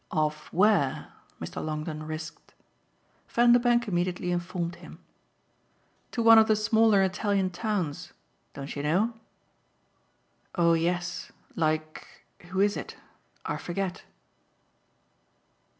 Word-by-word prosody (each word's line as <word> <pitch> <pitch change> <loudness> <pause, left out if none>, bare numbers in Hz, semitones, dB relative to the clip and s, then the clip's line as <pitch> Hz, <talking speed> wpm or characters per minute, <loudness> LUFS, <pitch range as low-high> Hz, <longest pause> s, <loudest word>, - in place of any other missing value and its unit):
"Off 155 -2 -2
where?" 165 -7 +2 0.3
Mr. 85 +1 -6
Longdon 155 0 -4
risked. 155 0 -8 0.7
Vanderbank 240 0 +4
immediately 180 -1 -1
informed 175 -1 -3
him. - - -12 1.1
"To 235 - -2
one 225 0 +9
of 220 - +4
the 215 - +4
smaller 215 -1 +4
Italian 190 0 0
towns. 180 -5 -3 0.4
Don't 140 0 -6
you 145 - -3
know?" 185 +11 +1 1.4
"Oh 170 -2 +4
yes. 175 +2 -1 0.2
Like 155 -1 -3 0.2
who 190 +2 -1
is 205 0 +3
it? - - -7 0.5
I - - -2
forget." 180 +1 -4
180 Hz, 105 wpm, -27 LUFS, 155-205 Hz, 1.4 s, one